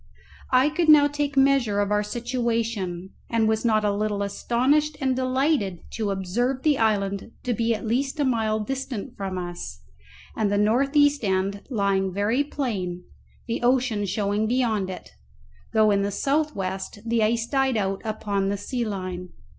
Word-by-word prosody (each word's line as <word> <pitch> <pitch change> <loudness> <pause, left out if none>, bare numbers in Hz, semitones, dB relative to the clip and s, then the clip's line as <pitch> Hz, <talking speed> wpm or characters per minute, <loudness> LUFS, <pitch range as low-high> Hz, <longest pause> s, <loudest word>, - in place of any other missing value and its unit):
I 260 +3 +4
could 315 +1 0
now 295 -1 +8
take 290 -1 -3
measure 270 -7 +3
of 205 0 0
our 210 0 +3
situation, 230 -5 -2 0.2
and 225 -1 +2
was 220 0 +1
not 215 -2 +2
a 205 - +2
little 205 -1 -1
astonished 270 +9 +1
and 265 -2 +1
delighted 260 - 0
to 215 -3 -2
observe 235 +8 -1
the 300 -3 +3
island 200 -1 0
to 245 - 0
be 230 0 +1
at 215 - -7
least 270 +6 -1
a 290 - +2
mile 220 -4 +1
distant 260 0 -4
from 195 -3 -4
us, 175 - -6 0.5
and 210 -2 0
the 205 - +2
north 245 +8 +2
east 290 -2 +4
end 195 0 0
lying 200 -5 +1
very 205 +8 +1
plain, 200 -12 -3 0.4
the 230 - -3
ocean 245 -4 +1
showing 205 +2 0
beyond 225 -5 0
it, 185 - -8 0.6
though 215 -1 +4
in 200 -1 +2
the 200 - 0
south 295 +9 0
west 190 +1 -4
the 230 0 +1
ice 225 +1 +1
died 270 -1 +1
out 195 -1 -1
upon 205 -3 -1
the 200 - -1
sea 240 +5 -3
line. 185 -4 -4
220 Hz, 170 wpm, -25 LUFS, 200-260 Hz, 0.6 s, now